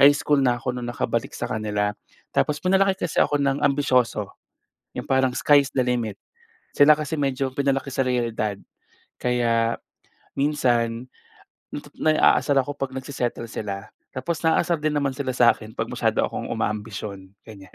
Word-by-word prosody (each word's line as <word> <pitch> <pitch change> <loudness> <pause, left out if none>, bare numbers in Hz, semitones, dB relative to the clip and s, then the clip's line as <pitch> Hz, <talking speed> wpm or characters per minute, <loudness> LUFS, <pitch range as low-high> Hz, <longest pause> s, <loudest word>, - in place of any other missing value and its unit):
high 140 - +9
school 145 -1 +2
na 125 -2 +2
ako, 125 +1 -3
na 125 - -5
nakabalik 120 - -2
sa - - -3
kanila 105 -1 -1 0.4
tapos 150 0 +1
pinalaki 190 +1 +2
kasi - - +2
ako 145 - +1
na 140 -1 +2
ang - - -6
ambisyoso, 130 -7 +2 0.7
yung - - -4
parang 130 -1 +2
sky 145 -1 +5
is 140 - -5
the 130 - +3
limit. 120 -4 -1 0.6
Sila 145 +2 +8
kasi 150 +1 -3
medyo 135 -1 0
pinalaki 140 -1 0
sa 135 0 0
realidad. 115 -4 -1 0.6
Kaya 115 -2 +1 0.6
minsan, 125 -4 0 0.7
natu - - -7
naaasar 155 -2 +3
ako 145 +2 -6
'pag 135 -1 -3
nagse-settle 130 -3 -3
sila 100 -1 -5 0.3
tapos 140 +6 -3
naaasar 170 +1 +2
din 150 0 -1
naman 140 -2 +1
sila 130 -3 -3
sa 120 -1 +6
akin 110 0 -12
'pag - - -3
masyado - - 0
akong - - -3
uma-ambisyon, 105 -2 -4
ganyan. 100 -4 -14
130 Hz, 160 wpm, -24 LUFS, 115-145 Hz, 0.7 s, high